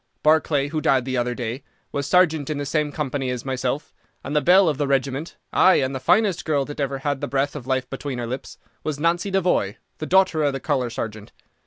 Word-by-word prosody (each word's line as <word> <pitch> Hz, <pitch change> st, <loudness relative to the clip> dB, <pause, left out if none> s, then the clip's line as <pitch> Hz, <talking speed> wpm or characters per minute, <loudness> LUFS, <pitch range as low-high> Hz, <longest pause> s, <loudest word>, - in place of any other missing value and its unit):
Barclay, 150 Hz, -2 st, +3 dB
who 155 Hz, 0 st, -2 dB
died 130 Hz, -3 st, +2 dB
the 130 Hz, -1 st, -2 dB
other 120 Hz, 0 st, 0 dB
day, 120 Hz, +2 st, -4 dB, 0.3 s
was 140 Hz, -1 st, -2 dB
sergeant 160 Hz, -4 st, +3 dB
in 155 Hz, -, -2 dB
the 145 Hz, -, -3 dB
same 150 Hz, +1 st, 0 dB
company 140 Hz, -3 st, -2 dB
as 125 Hz, 0 st, -4 dB
myself, 130 Hz, +2 st, -2 dB, 0.3 s
and 145 Hz, -, -4 dB
the 150 Hz, -, +4 dB
belle 185 Hz, +3 st, +6 dB
of 150 Hz, -3 st, 0 dB
the 145 Hz, -, +1 dB
regiment, 135 Hz, +3 st, -1 dB, 0.2 s
ay, 185 Hz, -, +6 dB
and 130 Hz, 0 st, +1 dB
the 130 Hz, -, -3 dB
finest 200 Hz, -, +2 dB
girl 145 Hz, -3 st, +1 dB
that 145 Hz, +1 st, -8 dB
ever 140 Hz, -1 st, -1 dB
had 140 Hz, 0 st, -2 dB
the -, -, -2 dB
breath 140 Hz, +1 st, -1 dB
of 130 Hz, -4 st, -7 dB
life 130 Hz, -1 st, 0 dB
between 135 Hz, -1 st, -5 dB
her 120 Hz, -, -3 dB
lips, 130 Hz, +3 st, -6 dB, 0.3 s
was 150 Hz, -2 st, -3 dB
Nancy 170 Hz, +5 st, +1 dB
Devoy, 180 Hz, -, +1 dB, 0.2 s
the 155 Hz, -, -4 dB
daughter 190 Hz, -4 st, +3 dB
of 145 Hz, -1 st, +1 dB
the 135 Hz, -, -3 dB
colour 130 Hz, -3 st, 0 dB
sergeant. 110 Hz, -2 st, -6 dB
140 Hz, 225 wpm, -23 LUFS, 130-155 Hz, 0.3 s, belle